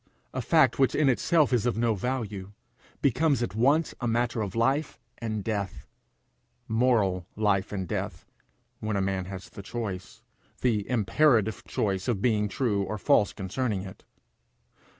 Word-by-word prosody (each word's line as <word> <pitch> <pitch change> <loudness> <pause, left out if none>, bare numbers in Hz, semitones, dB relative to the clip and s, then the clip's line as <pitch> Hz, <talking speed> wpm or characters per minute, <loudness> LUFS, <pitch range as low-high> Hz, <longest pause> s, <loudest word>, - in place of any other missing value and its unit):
A - - -2
fact - - +3
which 135 - +3
in 150 -2 +4
itself 150 +2 +3
is 120 0 +2
of 120 - 0
no 115 -1 +2
value, 105 -3 -3 0.5
becomes 140 0 +2
at 100 - -3
once 140 +9 +2
a 120 - 0
matter 120 0 0
of 100 -1 -4
life 135 +7 +1 0.2
and 110 -3 -3
death 100 -4 -3 0.8
moral 110 -6 +2
life 105 -3 +1
and 95 -3 -3
death, - - -4 0.5
when 110 -1 -2
a - - +1
man 95 -1 -1
has 95 0 -7
the - - -9
choice, 100 -3 -6 0.4
the 110 -5 +1
imperative 115 -2 +2
choice 95 -3 -1
of 120 -6 +1
being 105 -1 +2
true 105 -1 0
or 105 +2 -3
false 100 +1 +3
concerning 105 +1 -2
it. 95 -2 -10
110 Hz, 150 wpm, -27 LUFS, 100-125 Hz, 0.8 s, in